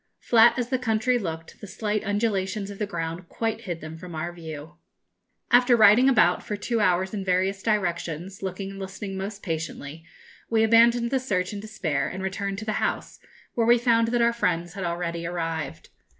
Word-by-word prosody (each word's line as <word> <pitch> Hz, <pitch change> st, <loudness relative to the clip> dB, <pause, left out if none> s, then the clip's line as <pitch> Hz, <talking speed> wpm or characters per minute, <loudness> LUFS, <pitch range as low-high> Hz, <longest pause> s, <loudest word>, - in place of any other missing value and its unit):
Flat 235 Hz, +1 st, +5 dB
as 245 Hz, -1 st, -2 dB
the 260 Hz, -1 st, 0 dB
country 245 Hz, +1 st, +1 dB
looked, 165 Hz, -5 st, -6 dB
the 205 Hz, -, -8 dB
slight 210 Hz, +2 st, -2 dB
undulations 205 Hz, -1 st, -1 dB
of 200 Hz, -, -10 dB
the 210 Hz, -, -1 dB
ground 170 Hz, -1 st, -5 dB
quite 225 Hz, -1 st, -2 dB
hid 175 Hz, -3 st, -5 dB
them 160 Hz, +1 st, -8 dB
from 175 Hz, -1 st, -9 dB
our 170 Hz, +2 st, -4 dB
view. 160 Hz, -1 st, -9 dB, 0.7 s
After 245 Hz, 0 st, +6 dB
riding 220 Hz, +5 st, +7 dB
about 180 Hz, -9 st, +4 dB
for 210 Hz, -, -4 dB
two 230 Hz, +2 st, -1 dB
hours 185 Hz, -1 st, +2 dB
in 200 Hz, -2 st, -3 dB
various 190 Hz, +1 st, 0 dB
directions, 180 Hz, -3 st, -2 dB
looking 195 Hz, +1 st, -4 dB
and 195 Hz, -, -9 dB
listening 195 Hz, +1 st, -6 dB
most 200 Hz, +2 st, -5 dB
patiently, 160 Hz, -2 st, -5 dB, 0.5 s
we 225 Hz, -1 st, +3 dB
abandoned 235 Hz, +1 st, +4 dB
the 265 Hz, -, +2 dB
search 195 Hz, -7 st, -1 dB
in 205 Hz, -, -5 dB
despair, 190 Hz, -9 st, -2 dB
and 190 Hz, +1 st, -5 dB
returned 195 Hz, +1 st, -3 dB
to 215 Hz, -, -6 dB
the 215 Hz, -1 st, -1 dB
house, -, -, -2 dB, 0.3 s
where 230 Hz, -1 st, +1 dB
we 240 Hz, +1 st, +6 dB
found 230 Hz, -1 st, +3 dB
that 240 Hz, 0 st, +2 dB
our 235 Hz, 0 st, +3 dB
friends 175 Hz, -6 st, -1 dB
had 195 Hz, -, -5 dB
already 170 Hz, -1 st, -3 dB
arrived. 165 Hz, -2 st, -4 dB
195 Hz, 190 wpm, -25 LUFS, 175-225 Hz, 0.7 s, riding